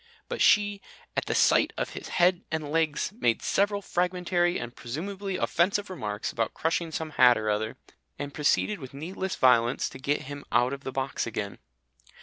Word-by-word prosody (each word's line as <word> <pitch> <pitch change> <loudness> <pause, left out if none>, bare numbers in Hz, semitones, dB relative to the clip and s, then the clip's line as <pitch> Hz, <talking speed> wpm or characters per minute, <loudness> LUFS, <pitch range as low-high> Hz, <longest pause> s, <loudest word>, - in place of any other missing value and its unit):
But - - -4
she, 205 -1 +4 0.3
at - - 0
the - - 0
sight - - +4
of - - -2
his - - -7
head 180 0 +3
and 155 -2 -3
legs, 160 0 +1
made 115 -2 +1
several 200 0 +1
fragmentary 180 0 +1
and 120 0 -7
presumably 190 +9 -4
offensive 200 +4 +1
remarks 105 - -3
about 115 -1 -2
crushing 165 0 -1
some 160 -1 -4
hat 125 -1 +8
or 110 -1 0
other, 110 +1 -2 0.4
and 145 0 -5
proceeded 155 +8 +1
with 135 -1 -10
needless 185 +5 -4
violence 120 -1 +3
to 135 - -11
get 145 +2 -1
him 145 +1 -7
out 125 +2 +3
of 140 0 -7
the 130 - -4
box 130 -2 -2
again. 105 -3 -4
150 Hz, 175 wpm, -27 LUFS, 125-180 Hz, 0.4 s, hat